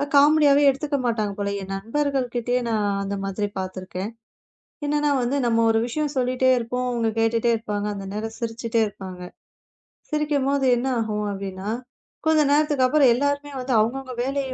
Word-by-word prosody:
காமெடியாவே 290 0 +6
எடுத்துக்க 285 +2 -1
மாட்டாங்க 215 -4 0
போல. 200 0 -1
என் 195 - -7
நண்பர்கள் 265 +6 -1
கிட்டயே 245 +1 0
நான் 215 -2 +1 0.2
அந்த 200 +1 -3
மாதிரி 195 +1 -2
பாத்துருக்கேன். 185 +2 -5 0.7
என்னன்னா 295 0 +1
வந்து 250 +4 0
நம்ம 230 -1 +3
ஒரு 225 0 +3
விஷயம் 295 +3 -2
சொல்லிட்டே 255 +1 +2
இருப்போம். 250 +2 -2
அவங்க 235 -2 0
கேட்டுட்டே 230 +1 +2
இருப்பாங்க. 210 -2 -3
அந்த 195 -1 -6
நேரம் 220 +1 -4
சிரிச்சுட்டே 230 0 -1
இருப்பாங்க. 185 -2 -9 0.9
சிரிக்கும்போது 280 -3 +1
என்ன 245 +2 -2
ஆகும் 210 -1 -2
அப்படின்னா, 195 0 -6 0.6
கொஞ்ச 315 -1 +4
நேரத்துக்கு 295 -3 +3
அப்புறம் 275 0 +5
எல்லாருமே 285 +3 -1
வந்து 255 0 -2
அவுங்க 230 +5 +1
அவுங்க 260 -1 -8
வேலையை 270 0 -2
240 Hz, 155 wpm, -23 LUFS, 215-280 Hz, 0.9 s, காமெடியாவே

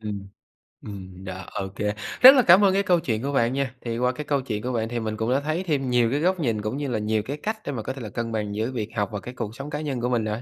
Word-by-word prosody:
Ừm, 100 -2 -5 0.5
ừm, 95 -2 -9
đó. 95 0 -6
OK, 95 0 -5 0.5
rất 260 +2 +11
là 255 - +6
cảm 180 +4 +8
ơn 195 -1 +5
cái 200 +1 +2
câu 175 -2 +3
chuyện 115 -6 -2
của 140 - -1
bạn 120 -2 +2
nha. 135 -2 -2
Thì 115 -1 -3
qua 125 +1 +2
cái 150 +4 -6
câu 140 -2 +1
chuyện 105 -5 -4
của 125 0 -2
bạn 115 -1 -1
thì 120 -1 -2
mình 110 -1 -3
cũng 115 +3 -1
đã 135 - +3
thấy 155 +5 -2
thêm 140 -7 -1
nhiều 120 -1 +3
cái 145 - +1
góc 185 +2 +1
nhìn 115 -8 0
cũng 110 +6 -3
như 145 -1 -2
là 115 -4 -1
nhiều 105 0 0
cái 140 +3 -4
cách 220 +6 -3
để - - -2
mà 120 -5 -4
có 130 - -3
thể 135 - -9
là 110 - -6
cân 115 +2 -4
bằng 105 -2 -2
giữa 110 +4 -1
việc 110 -4 -3
học 105 0 0
và 105 - -3
cái 125 - -8
cuộc 110 -3 -5
sống 140 +2 -7
cá 150 +1 -3
nhân 135 -5 -3
của 125 - 0
mình 120 -3 +1
rồi. 110 +2 -3
120 Hz, 325 wpm, -25 LUFS, 110-140 Hz, 0.5 s, rất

